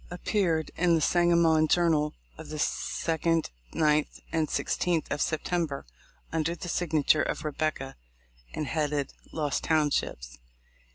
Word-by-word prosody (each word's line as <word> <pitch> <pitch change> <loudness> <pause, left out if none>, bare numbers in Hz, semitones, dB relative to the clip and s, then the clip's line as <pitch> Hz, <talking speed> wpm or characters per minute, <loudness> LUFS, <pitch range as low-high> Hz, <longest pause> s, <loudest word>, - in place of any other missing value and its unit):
appeared 175 -3 0
in 175 -1 +3
the - - +2
Sangamon 170 -1 +4
Journal, 155 -3 +2 0.2
of - - -10
the 155 - -5
2d, 165 +1 0 0.3
9th, 150 -1 +2
and 160 -2 +1
16th 170 0 0
of 145 - -1
September, 160 -2 -1 0.5
under 165 +1 0
the 175 - -7
signature 155 -3 +2
of - - -2
"Rebecca," 150 -2 -2 0.6
and 155 - -3
headed 150 -2 -1 0.2
"Lost 150 -3 -1
Townships." 145 - 0
155 Hz, 120 wpm, -28 LUFS, 150-170 Hz, 0.6 s, Sangamon